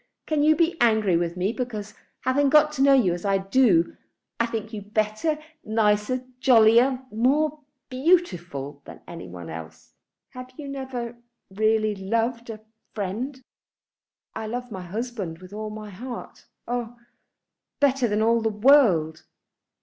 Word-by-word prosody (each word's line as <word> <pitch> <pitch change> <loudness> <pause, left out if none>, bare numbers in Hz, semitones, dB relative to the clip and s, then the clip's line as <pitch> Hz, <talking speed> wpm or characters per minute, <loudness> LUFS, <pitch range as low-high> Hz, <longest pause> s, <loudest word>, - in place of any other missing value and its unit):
Can 305 -2 0
you 310 +1 +5
be 335 +1 +1
angry 220 -6 +3
with 170 +1 -1
me 190 +5 0
because, 215 -4 -5 0.3
having 275 +2 +2
got 300 +1 +5
to 290 -3 -3
know 275 0 +6
you 205 -10 +3
as 175 - -6
I 195 -1 +2
do, 195 -3 +3 0.4
I 235 - +2
think 225 -1 -5
you 210 - -5
better, 215 +8 -1 0.3
nicer, 215 +3 +1
jollier, 250 +1 +5
more 285 +7 +1 0.3
beautiful 180 - 0
than - - -12
any 170 -1 -8
one 85 -1 -9
else? 80 0 -10 0.4
Have 255 0 -9
you 295 - -7
never 260 -4 -5 0.3
really 215 +1 +1
loved 230 +4 -2
a 215 -1 -7 0.3
friend?" 225 +7 -4 0.9
"I 220 - -5
love 245 +2 -5
my 190 -3 -6
husband 200 -2 -5
with 185 +2 -13
all 215 0 -5
my 215 -1 -8
heart, 240 +6 -9 0.2
oh, 240 -1 -3 0.8
better 270 -3 +3
than 210 0 +1
all 230 +1 +3
the 220 - +1
world." 210 - +4
225 Hz, 145 wpm, -25 LUFS, 200-255 Hz, 0.9 s, know